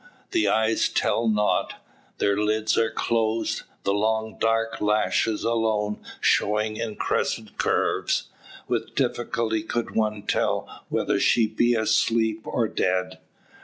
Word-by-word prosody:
The 345 -3 +2
eyes 110 0 +2
tell 115 - +1
nought; 105 -1 +1 0.4
their 100 - +2
lids 105 +1 +1
are 115 -1 +2
closed, 115 0 0 0.2
the 100 - +1
long 110 +1 -1
dark 115 0 0
lashes 105 +1 +1
alone 110 -2 0 0.2
showing 110 +1 +1
in 110 -2 -4
crescent - - -2
curves. - - +1 0.4
With - - -2
difficulty 115 -2 0
could 115 +2 -3
one 105 -2 0
tell - - -2
whether - - 0
she 115 - +4
be 120 +3 +2
asleep, 110 0 +1
or 115 -2 0
dead. 95 -2 -1
110 Hz, 125 wpm, -25 LUFS, 105-115 Hz, 0.4 s, she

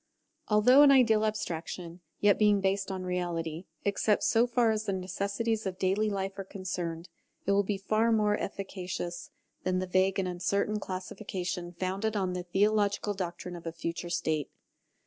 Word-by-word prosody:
Although 225 +6 +6
an 290 - +8
ideal 235 -6 +5
abstraction, 175 -4 -4 0.2
yet 205 -1 +4
being 210 -1 +5
based 195 0 0
on 190 -1 -4
reality, 175 -2 -3 0.2
except 205 +1 +2
so 235 +1 +4
far 240 -2 +3
as 215 0 -1
the 200 - -1
necessities 200 +4 -2
of 185 -1 -4
daily 195 +3 +1
life 195 -1 -3
are - - -2
concerned, 180 -3 -5 0.4
it 200 - +2
will 200 0 +4
be 200 0 -2
far 215 +4 +1
more 210 -2 +3
efficacious 180 -3 -5 0.3
than 185 0 0
the 185 - -1
vague 185 +1 +2
and 190 -1 0
uncertain 200 +4 0
classification 185 -2 -4
founded 190 +5 -2
on 190 -3 0
the 180 - -2
theological 205 +3 +1
doctrine 180 -1 -5
of 170 -1 -8
a - - -2
future 170 +1 -4
state. 160 -4 -1
195 Hz, 165 wpm, -30 LUFS, 180-210 Hz, 0.4 s, an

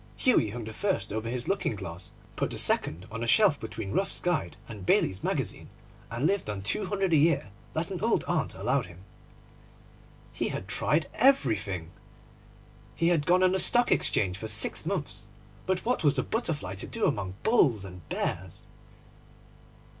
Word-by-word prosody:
Hughie 235 - +3
hung 115 +3 -6
the 110 +1 -7
first 195 - -1
over 110 +1 -3
his 125 0 -4
looking 195 - 0
glass, 95 -1 -8 0.2
put - - -1
the - - -6
second 85 +4 +2
on 115 0 -4
a - - -2
shelf 170 - +4
between 110 -2 -6
Ruff's 195 - +1
Guide 155 - -1
and 105 -4 -9
Bailey's 95 +1 +2
Magazine, - - -2 0.4
and 120 +5 -2
lived 200 - +1
on 100 -2 -4
two 105 - -1
hundred 195 -2 0
a - - +6
year 145 -9 +2 0.2
that - - -1
an - - -4
old - - +2
aunt - - -1
allowed - - 0
him. 90 +1 -14 1.3
He - - -1
had 95 - -5
tried 150 +8 +1
everything. 110 - +2 1.0
He 165 +1 +2
had 160 -4 +1
gone 180 +1 +4
on 185 - +5
the 190 - +1
Stock 240 +4 +6
Exchange 95 -1 +1
for 110 - -5
six 105 -1 +1
months; - - -2 0.4
but 185 -1 -1
what 245 -5 0
was 145 -2 +3
a 130 - +1
butterfly 155 - -2
to 95 - -6
do - - -1
among 95 -2 -1
bulls 125 - +3
and 90 -1 -10
bears? - - -3
115 Hz, 175 wpm, -28 LUFS, -, 1.3 s, a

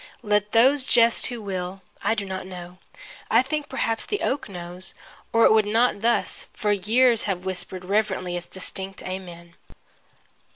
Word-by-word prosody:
Let 210 -1 +1
those 260 +5 +5
jest 235 -2 +4
who 245 -2 -5
will. 190 -1 -4 0.2
I 225 - +1
do 205 -3 -3
not 190 -1 -5
know. 180 -1 -9 0.5
I - - +5
think 295 +2 -3
perhaps 230 -4 -1
the 415 - -3
oak 270 -4 -1
knows 180 0 -5 0.4
or 230 0 +5
it - - +6
would 215 -1 +4
not 225 0 +2
thus 235 +1 0
for 210 -2 0
years 225 +4 +3
have 190 -3 -2
whispered 185 0 -4
reverently 190 -3 0
its 175 0 -5
distinct 190 +1 -5
Amen! 175 -2 -7
200 Hz, 160 wpm, -24 LUFS, 185-230 Hz, 0.5 s, it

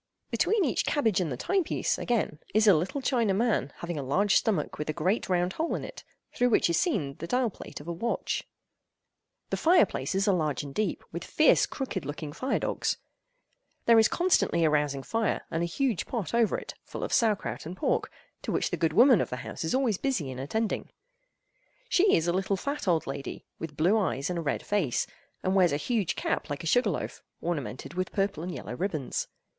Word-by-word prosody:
Between 430 -5 +2
each 260 - +1
cabbage 225 -10 +1
and 165 -5 -1
the 125 - -3
time 380 - +1
piece, - - -1
again, 220 -10 -1 0.2
is 215 0 +5
a 205 - +8
little 185 - -1
China 230 -7 +2
man 210 - +1
having 170 -3 -4
a - - -3
large 195 +10 +2
stomach 190 -11 +1
with 150 - -3
a - - +1
great 185 +7 0
round 180 0 +1
hole 325 +1 -1
in - - -4
it, - - -10 0.3
through 245 0 +2
which 210 - +3
is - - +2
seen 185 - 0
the 165 - -5
dial 245 +2 +1
plate - - -9
of 145 - -12
a 170 - -2
watch. 230 +8 -2 1.1
The - - 0
fireplaces 205 - +3
are 200 - +5
large 155 -5 0
and 140 -1 -8
deep, 215 +5 -1
with - - -5
fierce - - +4
crooked 255 - -4
looking 145 +1 -5
fire 260 - -1
dogs. - - -1 0.9
There 230 -1 +7
is 220 - +6
constantly 345 - +2
a 155 - +3
rousing 145 -2 +1
fire, 225 - -1
and 165 - -1
a 170 - +1
huge 230 +1 -1
pot 230 -6 -3
over 235 -3 +3
it, - - -7
full - - -7
of - - -3
sauer 225 -4 +4
kraut 190 - -6
and 180 +3 -7
pork, - - 0 0.3
to - - -4
which - - 0
the - - -1
good 165 -2 +1
woman 240 - +7
of - - -2
the - - -3
house 110 - -5
is 160 - 0
always 245 -8 +1
busy 205 - -1
in 130 - -7
attending. 220 +11 -2 1.0
She 385 +3 +5
is 165 +1 +1
a 175 - +2
little 190 +1 0
fat 280 +3 -4
old 165 -3 +2
lady, 135 0 -6
with 150 -3 -6
blue 185 +8 +4
eyes 160 -5 -1
and 175 - -2
a - - -2
red 150 - -2
face, 185 - +1 0.4
and 185 - +1
wears 185 -3 +4
a 145 - +1
huge 195 +1 0
cap - - -2
like 145 +4 -4
a - - -6
sugar 245 +10 +3
loaf, - - -4 0.2
ornamented 145 -4 -4
with 185 +1 -2
purple 195 -4 -1
and 180 +2 -4
yellow 125 - -6
ribbons. 160 -5 -2
185 Hz, 215 wpm, -28 LUFS, 155-230 Hz, 1.1 s, a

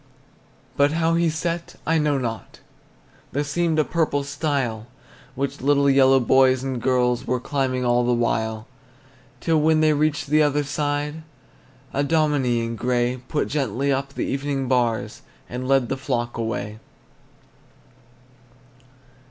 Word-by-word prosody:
But 145 +1 +3
how 165 0 +1
he 170 0 +2
set, 170 +2 -3
I 165 0 +2
know 150 -2 +1
not. 115 -6 -5 0.7
There 145 - 0
seemed 160 +2 0
a 155 - +4
purple 155 -3 0
stile 140 -6 -2 0.5
Which 135 -1 -3
little 140 +1 +3
yellow 135 0 +5
boys 130 +1 +3
and 130 -3 -3
girls 125 -1 +1
Were 125 0 0
climbing 130 -1 -1
all 120 0 +3
the 120 - +1
while 110 -2 -1 0.8
Till 160 -2 +2
when 155 +1 +3
they 155 -1 +4
reached 150 -1 0
the 155 0 +5
other 145 0 +2
side, 145 +1 -2 0.7
A 140 - +1
dominie 140 -6 +1
in 115 0 -4
gray 125 +1 0
Put 150 - -1
gently 140 -1 -1
up 140 +1 -3
the - - -2
evening 135 -1 -2
bars, 120 -3 0 0.3
And 125 +1 -5
led 135 -2 +3
the 135 - -2
flock 125 -3 -2
away. 110 -2 -4
135 Hz, 140 wpm, -23 LUFS, 125-150 Hz, 0.8 s, yellow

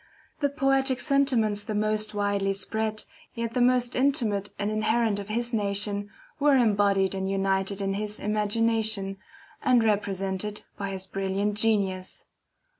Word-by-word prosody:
The 285 -2 +1
poetic 270 -2 +1
sentiments 250 -8 +2
the 215 - -4
most 215 0 0
widely 200 -1 0
spread, 215 +2 -2 0.3
yet 230 -1 -3
the 250 - +1
most 250 0 +3
intimate 230 -7 +1
and 205 +1 -2
inherent 215 0 +1
of 200 0 -8
his 235 +2 -2
nation, 205 -1 0 0.3
were 290 -1 +4
embodied 200 -5 +3
and 190 0 -2
united 195 0 0
in 195 0 -1
his 210 +1 -4
imagination, 215 -1 +1 0.4
and 250 -4 +3
represented 200 -1 -1
by 200 -1 -4
his 190 -1 -4
brilliant 195 +2 -2
genius. 200 -4 -1
210 Hz, 135 wpm, -26 LUFS, 200-230 Hz, 0.4 s, were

